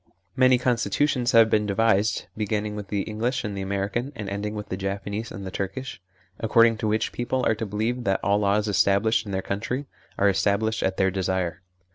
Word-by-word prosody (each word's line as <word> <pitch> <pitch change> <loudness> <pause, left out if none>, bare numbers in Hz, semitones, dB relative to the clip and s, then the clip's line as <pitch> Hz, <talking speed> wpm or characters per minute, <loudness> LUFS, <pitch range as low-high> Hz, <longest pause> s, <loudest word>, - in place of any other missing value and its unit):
Many 130 -1 +5
constitutions 125 +1 +1
have 115 -1 +7
been 105 -1 +2
devised, 105 0 +2
begin 105 -1 -1
ning 105 -1 -4
with 105 -1 -6
the 100 -1 -1
English 115 +4 -2
and 105 -2 -4
the 100 - -4
American 100 +7 -2
and 105 - -6
ending 105 +1 -3
with 105 -1 -6
the - - -2
Japanese 100 +3 -4
and 100 -3 -7
the 95 - -5
Turkish, 100 +3 -5 0.4
according 115 0 +4
to 110 - -2
which 110 +1 0
people 125 +1 -1
are - - +3
to 110 0 -4
believe 110 +5 -2
that 95 -1 +2
all 100 0 +2
laws 105 +1 +1
established 105 +2 +2
in - - -5
their 95 -1 -2
country 115 +8 -3 0.3
are 100 - +2
estab 100 +1 +2
lished 110 0 -1
at 95 0 0
their 95 0 +2
desire. 95 -2 -2
105 Hz, 205 wpm, -25 LUFS, 100-115 Hz, 0.4 s, have